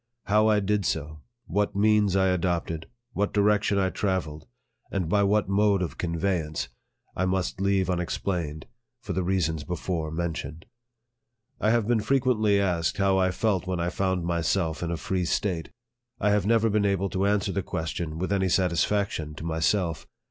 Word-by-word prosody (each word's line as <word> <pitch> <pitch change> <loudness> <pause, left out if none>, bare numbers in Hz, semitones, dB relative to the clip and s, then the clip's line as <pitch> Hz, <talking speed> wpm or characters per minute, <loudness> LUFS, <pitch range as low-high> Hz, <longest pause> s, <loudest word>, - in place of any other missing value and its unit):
How 105 +2 +3
I 105 -1 +4
did 105 0 0
so, 75 -2 -2 0.3
what 105 0 -1
means 105 -1 +3
I 95 -1 +3
adopted, 85 -3 -1 0.3
what 100 +1 0
direction 105 0 +2
I 95 -1 +1
travelled, 90 -6 -2 0.4
and 95 -4 -1
by 100 +5 +2
what 100 0 +2
mode 100 -1 +2
of 85 - -6
conveyance, 85 -4 -1 0.5
I 95 - 0
must 95 0 -1
leave 95 -2 +2
unexplained, 85 -3 -2 0.3
for 115 -6 -5
the 95 - 0
reasons 85 -4 0
before 85 0 -3
mentioned. 80 -1 -4 0.9
I 105 - +2
have 115 -2 +2
been 115 -2 +2
frequently 110 -4 +2
asked 90 -4 0
how 95 -1 +3
I 95 0 +3
felt 95 -1 0
when 90 -2 -1
I 85 +1 0
found 95 -3 -1
myself 85 -1 0
in 85 - -2
a 85 - -2
free 95 +2 -1
State. 85 -2 -1 0.5
I 105 - +2
have 105 -1 +2
never 115 0 +4
been 105 0 +2
able 100 -1 +1
to 95 +1 0
an 100 +1 +3
swer 95 - -3
the 100 - 0
question 80 -2 -4
with 95 +4 -1
any 95 -1 +1
satisfaction 90 -2 0
to 75 - -8
myself. 80 +1 0
95 Hz, 170 wpm, -26 LUFS, 85-100 Hz, 0.9 s, I